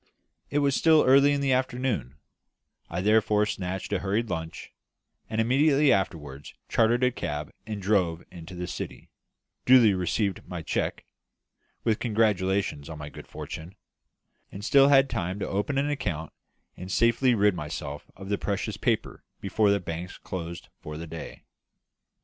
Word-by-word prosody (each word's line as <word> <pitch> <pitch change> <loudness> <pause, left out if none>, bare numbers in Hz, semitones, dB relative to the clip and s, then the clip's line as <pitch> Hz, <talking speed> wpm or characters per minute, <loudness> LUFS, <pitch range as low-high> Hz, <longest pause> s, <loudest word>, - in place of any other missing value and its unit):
It 145 - -1
was 140 -1 +2
still 160 -2 +5
early 140 +2 +6
in 140 0 0
the 135 -2 +2
afternoon; 125 - -1 0.7
I 85 +2 -2
therefore 105 +1 +3
snatched 95 0 -4
a 100 - +1
hurried 105 +4 -1
lunch; 80 -1 -5 0.6
and 110 0 -2
immediately 140 +5 +4
afterwards 75 -7 -3
chartered 120 +2 +2
a 125 - +4
cab 75 - -4 0.2
and 105 -2 -4
drove 90 -4 +1
into 90 0 -10
the 90 0 -4
City; 90 - -7 0.5
duly 125 -5 +6
received 95 +2 -1
my - - -6
cheque, - - -2 0.8
with 110 -1 +1
congratulations 100 - 0
on 80 - -7
my 75 0 -7
good - - -11
fortune; 85 +5 -8 0.8
and 100 +1 -7
still 140 +2 +6
had 135 -1 +6
time 90 -5 -3
to 105 - -3
open 105 +8 -1
an 145 +2 +1
account 85 - -3 0.4
and 90 +1 -8
safely 115 +3 +3
rid 105 -1 +4
myself 75 -2 -6
of 95 0 -10
the 100 - 0
precious 100 0 -2
paper 115 -1 -1 0.2
before 105 +1 +1
the 100 0 +3
banks 85 +1 -6
closed 85 -2 -7
for 75 0 -7
the 85 - -6
day. 80 0 -9
100 Hz, 155 wpm, -27 LUFS, 85-120 Hz, 0.8 s, early